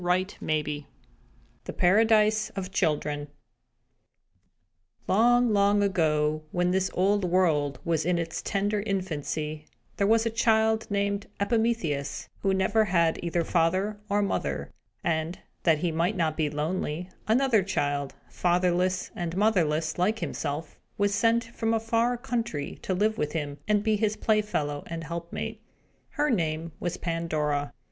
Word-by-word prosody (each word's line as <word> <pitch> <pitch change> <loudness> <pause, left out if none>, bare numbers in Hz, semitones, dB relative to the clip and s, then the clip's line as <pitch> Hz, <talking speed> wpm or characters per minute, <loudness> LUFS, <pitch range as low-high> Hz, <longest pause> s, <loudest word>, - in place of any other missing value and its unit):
CHAPTER 185 +2 0
VIII 150 -1 -2 0.8
THE - - -5
PARADISE 215 +2 +4
OF 190 -1 -4
CHILDREN 150 -5 0 1.8
Long, 240 +4 +4
long 205 0 +4
ago, 155 -5 +1
when 180 0 +1
this 190 0 +1
old 200 +2 +2
world 160 -6 +2
was 165 -2 +1
in 175 +2 +1
its 165 -1 -3
tender 205 +1 0
infancy, 155 -6 -3 0.3
there 200 - +2
was 225 +1 +4
a 230 - 0
child, 220 -1 +2
named 200 0 -1
Epimetheus, 200 - 0
who 195 - +1
never 195 +3 +2
had 170 -4 +2
either 170 0 0
father 185 +6 +1
or 205 +1 +2
mother; 200 - -2 0.3
and, 165 -1 -1 0.2
that 165 -3 +4
he 170 +2 -1
might 170 +6 0
not 160 -3 +1
be 155 -2 0
lonely, 155 +2 -2 0.2
another 235 -1 +4
child, 145 -7 -1
fatherless 180 +1 +1
and 175 0 -3
motherless 165 -7 +1
like 210 +5 +2
himself, 150 -6 -4 0.2
was 205 0 +2
sent 230 +3 +3
from 230 -1 -1
a - - +2
far 230 +2 +1
country, 235 - -3
to 185 - -1
live 215 +3 +1
with 150 0 -1
him, 145 -3 -3
and 210 -1 +2
be 215 -1 +2
his 215 0 0
playfellow 205 -10 0
and 165 -1 -5
helpmate. 170 +1 -5 0.5
Her 295 -1 0
name 165 -5 -1
was 175 +1 -3
Pandora. 155 -4 -1
185 Hz, 140 wpm, -27 LUFS, 160-210 Hz, 1.8 s, PARADISE